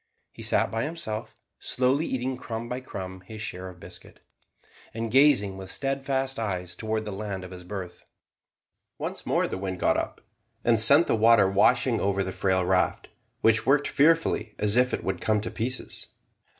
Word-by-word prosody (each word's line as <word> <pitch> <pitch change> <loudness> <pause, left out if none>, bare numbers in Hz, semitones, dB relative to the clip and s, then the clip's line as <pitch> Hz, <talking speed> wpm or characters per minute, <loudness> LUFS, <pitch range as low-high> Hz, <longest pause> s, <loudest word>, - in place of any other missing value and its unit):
He - - -12
sat - - +1
by 115 - -1
himself, 150 -9 -5 0.2
slowly 130 +5 0
eating 130 0 -2
crumb 115 -2 -6
by 125 +1 -4
crumb 95 -6 -8
his 110 -1 -9
share 95 -3 -5
of 90 -1 -14
biscuit, - - -13 0.8
and 115 -1 -3
gazing 125 -8 +4
with 95 -1 -9
steadfast 135 0 -2
eyes 90 -5 -3
towards 110 +2 -3
the 105 - -5
land 100 -1 -5
of 90 - -9
his 90 -1 -10
birth. 90 -1 -7 0.9
Once - - -6
more - - +2
the - - -5
wind 95 -2 -4
got - - +2
up, - - -4 0.4
and 115 -2 +3
sent 140 +9 +8
the - - 0
water 115 -2 +5
washing 120 +5 +3
over 100 0 0
the 95 - -4
frail 95 -1 0
raft, 90 0 0 0.3
which 110 -1 +3
worked 145 +2 +3
fearfully, 150 -8 +2
as 105 0 +3
if 125 +1 +3
it - - -3
would 95 -2 -3
come 110 -1 +2
to 105 - -5
pieces. 125 +3 -3
110 Hz, 175 wpm, -26 LUFS, 95-130 Hz, 0.9 s, sent